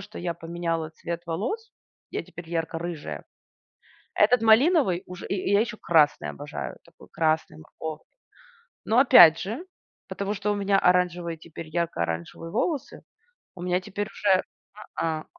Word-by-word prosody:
что 205 +2 -10
я 175 -1 -3
поменяла 165 -1 -3
цвет 170 +1 -6
волос- 240 - -3 0.4
я - - -3
теперь 170 -2 -11
ярко-рыжая. 165 - -4 0.9
Этот 225 +2 +4
малиновый 225 - +4
уже 180 -1 -8
И, - - -2
и 195 +1 -1
я 200 - +5
еще 235 -1 -2
красный 150 - +3
обожаю, 70 - -6
такой - - -18
красный, 155 - 0
морковный. 155 - -8 0.8
Но, 225 - +2
опять 175 - +9
же, 225 - -4 0.4
потому 200 +1 -3
что 210 0 -1
у 205 - 0
меня 200 -1 +2
оранжевые 175 -2 +1
теперь, 160 0 -10
ярко-оранжевые 155 - -3
волосы, 280 - -2 0.5
у 175 - -10
меня 180 +1 0
теперь 205 +2 -4
уже 210 -2 -2
Я, - - -1 0.7
а, 155 -1 -2
175 Hz, 145 wpm, -26 LUFS, 165-205 Hz, 0.9 s, опять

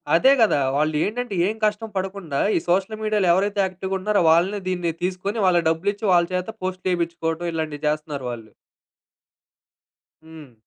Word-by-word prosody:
అదే 265 +11 +5
కదా! 220 -9 +4 0.2
వాళ్ళు 155 +1 +1
ఏంటంటే 230 -1 -3
ఏం 215 - -2
కష్టం 215 +1 -1
పడకుండా, 185 -7 -3 0.2
ఈ - - +4
సోషల్ 195 +5 0
మీడియాలో 210 -3 +1
ఎవరైతే 200 +2 0
యాక్టివ్‌గుంటున్నారో, 190 +1 -1
వాళ్ళనే 185 +5 +2
దీన్ని 175 -2 -1
తీసుకొని, 190 +4 -2
వాళ్ళకి 175 -3 +3
డబ్బులిచ్చి, 200 +6 -1
వాళ్ళ 175 -1 +5
చేత 180 +2 -1 0.2
పోస్ట్‌లేపించుకోవడం, 175 -2 -2
ఇలాంటియి 155 -2 -4
చేస్తున్నారు 150 -3 -3
వాళ్ళు. 115 -2 -9 1.7
హ్మ్. 155 -6 -13
180 Hz, 135 wpm, -23 LUFS, 160-200 Hz, 1.7 s, అదే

